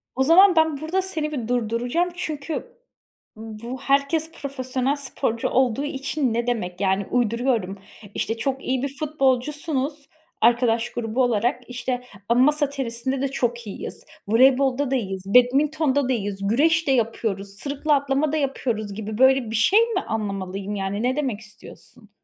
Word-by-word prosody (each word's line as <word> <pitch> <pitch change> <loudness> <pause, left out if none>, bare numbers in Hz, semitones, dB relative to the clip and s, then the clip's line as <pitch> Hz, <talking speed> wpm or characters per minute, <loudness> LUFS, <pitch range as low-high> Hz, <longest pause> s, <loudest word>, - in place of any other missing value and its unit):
O 265 - +2
zaman 360 +5 +6
ben, 320 -2 +3
burada 360 +5 0
seni 315 -5 -3
bir 245 -7 -4
durduracağım. 245 +8 0
Çünkü 325 - -5 0.6
bu 225 +3 -7
"Herkes 280 +4 +1
profesyonel 265 -1 -2
sporcu 250 -4 -2
olduğu 260 0 +1
için..." 275 -2 -2
ne 235 +1 -1
demek? 190 -6 -2
Yani, 190 0 +1
uyduruyorum: 235 -4 0 0.4
İşte, 225 +1 -2
çok 270 +3 -2
iyi 260 0 -1
bir 280 0 -4
futbolcusunuz, 290 +1 -1 0.3
arkadaş 235 0 +3
grubu 240 +2 -1
olarak. 245 +2 0
İşte, 250 0 -3 0.3
ama 240 +1 +4
"Masa 295 0 +3
tenisinde 260 -1 -3
de 275 - +1
çok 240 -4 -2
iyiyiz. 195 - -7 0.2
Voleybolda 260 +4 +3
da 270 - +2
iyiyiz. 195 -5 -3
Badminton'da 275 +4 +3
da - - +3
iyiyiz. 200 -3 -3
Güreş 320 +8 +2
de - - +3
yapıyoruz. 220 -5 -1
Sırıkla 290 +1 +1
atlama 280 +2 0
da 310 - 0
yapıyoruz." 235 -7 -2
gibi, 215 0 -5
böyle 260 -2 +4
bir - - -2
şey 230 - +5
mi 460 0 0
anlamalıyım 200 -2 -4
yani? 200 +2 -3
Ne 255 +2 +1
demek 260 -8 -2
istiyorsun? 215 -1 -15
255 Hz, 150 wpm, -23 LUFS, 225-285 Hz, 0.6 s, zaman